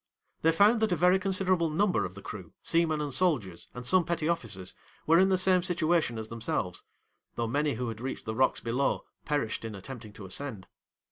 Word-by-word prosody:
'They 165 - +4
found 205 +7 +5
that 220 -2 +1
a - - +3
very 180 +3 +4
considerable 185 -3 +1
number 165 - +1
of 90 +1 -7
the 100 - -10
crew, 90 -6 -8
seamen 165 -2 +2
and 145 -2 -3
soldiers, 125 - 0
and 125 0 -7
some 185 +6 +4
petty 165 -2 -1
officers, 110 - -3 0.3
were 165 +2 +5
in 190 +1 +5
the 190 - +3
same 185 0 +4
situation 170 - +1
as 110 -1 -4
themselves, 110 -5 -3 0.5
though 115 - -1
many 145 +4 0
who 125 +2 -3
had 110 -1 -6
reached 130 +1 -5
the 110 - -3
rocks 130 +3 +2
below, 125 +4 -1 0.2
perished 145 -8 -1
in 110 -2 -5
attempting 110 +2 -9
to 105 -1 -10
ascend. 105 -1 -4
145 Hz, 200 wpm, -29 LUFS, 110-175 Hz, 0.5 s, found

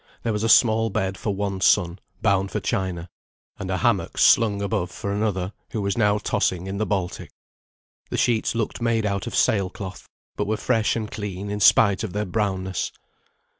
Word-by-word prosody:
There 115 - 0
was 105 - -2
a 115 - 0
small 115 -1 +5
bed 95 -1 -1
for 100 0 -3
one 100 -1 -3
son, 85 0 +3 0.2
bound 100 -2 +2
for - - -2
China; 90 -3 -2 0.5
and - - -5
a - - 0
hammock - - 0
slung 105 -3 +4
above 100 -3 -1
for 100 - -5
another, 100 -2 -1 0.2
who 110 - -1
was 100 -1 0
now 105 -2 +3
tossing 95 -3 -1
in 95 +1 -4
the 110 - 0
Baltic. 95 -4 -3 0.8
The - - -3
sheets 115 -1 +1
looked 115 0 -2
made 115 -2 +1
out 100 -2 -2
of - - -4
sail 100 -4 +2
cloth, 95 -1 -8 0.3
but - - -1
were 110 +1 0
fresh 110 -1 +1
and 110 -2 -4
clean 100 -1 -5
in 105 - -3
spite 100 0 +5
of 105 - -4
their 105 +1 -1
brownness. 95 -2 -2
100 Hz, 190 wpm, -23 LUFS, 95-110 Hz, 0.8 s, small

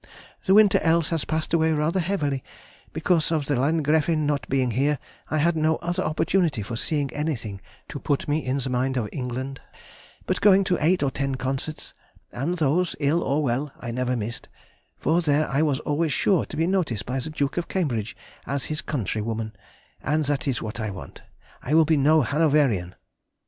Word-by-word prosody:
The 190 - +5
winter 210 -2 +6
else 165 -1 +2
has 165 -3 0
passed 160 +1 -2
away 160 -1 +3
rather 155 +4 +1
heavily, 150 -7 -1 0.5
because 165 -4 +1
the 165 - +1
Landgräfin 150 +2 +1
not 145 -1 -1
being 130 -2 +1
here, 140 +5 +1 0.3
I 155 - 0
had 165 +3 +2
no 160 0 +2
other 175 +3 -2
opportunity 155 - +1
for 115 +3 -5
seeing 145 +3 -1
anything 115 -10 -3 0.3
to - - -5
put 145 - -1
me 150 +1 0
in 130 +2 -1
mind 130 +1 0
of 115 -4 -1
England, 130 +1 -4 0.6
but - - -1
going 195 -1 +6
to 185 -2 +1
eight 175 +1 +3
or 135 - +1
ten 135 0 -2
concerts, 135 +4 -4 0.4
and 155 +9 -2
those, 165 +4 +1
ill 155 +3 +2
or 150 0 0
well, 135 +2 -1
I 115 - -5
never 125 +1 -1
missed, 115 +1 -5 0.5
for 170 +2 +2
there 150 -1 +2
I 140 +2 +1
was 150 -3 +1
always 150 +2 0
sure 190 -5 +2
to - - -8
be 160 - +2
noticed 170 - 0
by 130 +2 -2
the 150 - -5
Duke 145 -1 -2
of 170 - -1
Cambridge 120 - -2 0.3
as 140 -2 -2
his 150 - -3
countrywoman 110 -4 -3 0.5
(and 155 +2 0
that 145 +1 -1
is 130 -4 -1
what 110 +1 -5
I 110 -1 -2
want, 95 -2 -9 0.4
I 145 - 0
will 160 0 +6
be 160 +1 +3
no 150 +3 +4
Hanoverian!) 140 - +2
145 Hz, 185 wpm, -25 LUFS, 130-160 Hz, 0.6 s, winter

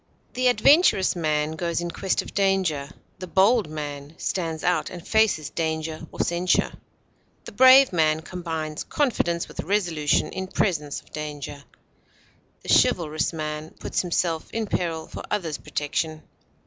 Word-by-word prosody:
The 255 0 +1
adventurous 245 - +4
man 155 -2 0
goes 170 +1 -2
in 175 0 -3
quest 190 +1 -1
of - - -11
danger; 190 -8 +1 0.3
the 185 - -6
bold 195 +2 +3
man 145 0 -6
stands 165 -4 -3
out 175 -3 +1
and 175 -1 -10
faces 205 -10 +2
danger 160 0 -3
or - - -12
censure; 175 +1 +1 0.7
the - - -8
brave 260 +2 +7
man 155 -2 +2
combines 160 -3 -5
confidence 175 - 0
with - - -13
resolution 170 -6 0
in 190 0 -4
presence 155 -7 -1
of - - -26
danger; 145 -2 -6 1.0
the - - -9
chivalrous 155 -3 0
man 155 -1 -5
puts - - -1
himself 170 -2 -1
in 225 -1 -2
peril 165 -5 -2
for - - -8
others' 165 -8 -2
protection. 155 +1 -3
165 Hz, 140 wpm, -24 LUFS, 155-190 Hz, 1.0 s, brave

